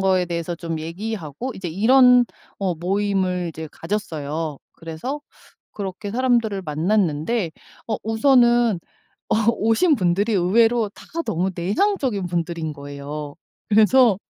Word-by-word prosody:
거에 190 -2 +2
대해서 170 0 -3
좀 165 -1 -4
얘기하고 180 - -5
이제 190 - -6
이런 250 +7 +5 0.4
어 185 -3 0
모임을 185 0 0
이제 160 -1 -7
가졌어요. 160 -6 -4 0.2
그래서 165 - -5 0.5
그렇게 200 +1 -5
사람들을 235 -5 +1
만났는데 170 +3 0 0.4
어 220 - 0
우선은 240 -2 +4 0.5
어 - - +3 0.2
오신 230 - +2
분들이 195 +2 +1
의외로 225 +4 +3
다 - - -14 0.2
너무 180 +3 0
내향적인 210 - 0
분들인 170 -2 -3
거예요. 145 +1 -7 0.3
그래서 220 0 +5
190 Hz, 280 characters per minute, -22 LUFS, 165-225 Hz, 0.5 s, 이런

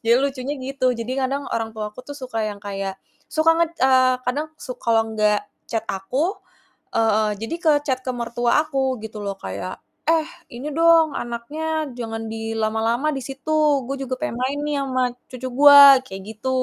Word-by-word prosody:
jadi 230 - +6
lucunya 275 0 -2
gitu, 265 0 -2
jadi 230 +2 -4
kadang 275 +2 -3
orang 225 -1 -2
tua 215 -1 -4
aku 230 - -10
tuh 285 - -7
suka 250 -5 -3
yang 205 -1 -8
kayak 195 -1 -4 0.3
suka 315 +1 +3
nge 335 - +4 0.2
eee, 260 -1 +5
kadang 285 +5 -1
su 255 - -7
kalau 225 -1 +2
nggak 210 -1 +2 0.3
chat 225 -1 -2
aku, 265 - -1 0.6
eee, 215 -1 +2
jadi 225 +8 -4
ke 315 - +5 0.2
chat 260 -3 +1
ke - - 0
mertua 240 +3 +1
aku 270 -4 -1
gitu 220 -1 -7
loh 200 -1 -3
kayak, 95 - -6 0.3
"Eh 325 -1 +3 0.3
ini 255 +5 -5
dong 330 0 +5
anaknya 300 +6 -3
jangan 225 -1 -5
di 225 0 -4
lama-lama 225 +5 0
di - - -3
situ, 270 +3 -5 0.3
gua 275 +2 -3
juga 265 -1 -3
pengen 305 -6 -3
main 265 +3 -1
nih 295 -1 -1
ama 255 -1 0 0.3
cucu 255 0 -5
gua," 280 0 +9
kayak 195 -6 -8
gitu. 230 +4 -4
255 Hz, 180 wpm, -22 LUFS, 225-280 Hz, 0.6 s, gua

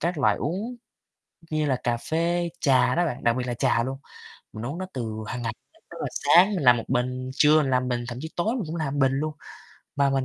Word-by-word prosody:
các 170 -1 -1
loại 105 -6 +3
uống 195 - -3 0.7
như 155 -1 0
là 135 -3 +1
cà 120 -1 +1
phê, 170 +6 -1
trà 135 -2 +3
đó 175 0 +2
bạn, 125 - -5
đặc 120 0 +3
biệt 125 -1 -2
là 120 - -1
trà 115 0 +2
luôn. 135 +1 -4 0.6
Mình 110 +2 -6
uống 140 +7 -4
nó 185 - -4
từ 115 -4 -4
hàng 125 - -4
ngày, 115 -2 -2 0.4
tức - - -9
là - - -1
sáng 190 +5 +5
mình 175 - -2
làm 125 -1 +7
1 115 - -4
bình, 125 +1 -1
trưa 150 +2 +5
mình 140 - -1
làm 125 0 +1
bình, 120 -1 -1
thậm 120 - -6
chí 160 - -5
tối 215 +8 0
mình 245 - -2
cũng 160 - -4
làm 155 -5 -2
1 - - -1
bình 135 -1 +4
luôn. 150 +3 -1 0.6
Mà 140 -1 +3
mình 135 -1 +1
135 Hz, 250 wpm, -25 LUFS, 125-165 Hz, 0.7 s, làm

